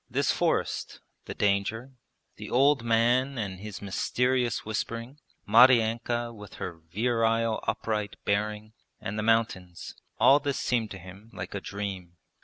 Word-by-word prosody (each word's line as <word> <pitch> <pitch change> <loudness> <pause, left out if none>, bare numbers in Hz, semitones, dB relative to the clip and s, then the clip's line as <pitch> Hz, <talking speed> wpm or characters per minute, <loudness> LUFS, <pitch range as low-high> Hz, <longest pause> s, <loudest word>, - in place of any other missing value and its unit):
This - - +1
forest, - - -1 0.3
the - - -7
danger, 105 +5 0 0.5
the - - -8
old 135 0 +3
man 120 +4 +2
and 100 -5 -4
his 105 -1 -8
mysterious 125 +5 0
whispering, 115 +5 -4 0.3
Maryanka 120 0 +4
with 105 -3 -11
her 85 -2 -6
virile 115 +1 +1
upright 105 -2 -2
bearing, 105 +1 -1 0.3
and 105 +2 -4
the - - 0
mountains 105 -6 0 0.3
all 140 +2 +7
this 140 -2 -2
seemed 115 -3 0
to 95 - -7
him 95 +4 -13
like 90 0 -6
a 100 - -4
dream. 95 -4 -6
110 Hz, 135 wpm, -28 LUFS, 100-120 Hz, 0.5 s, all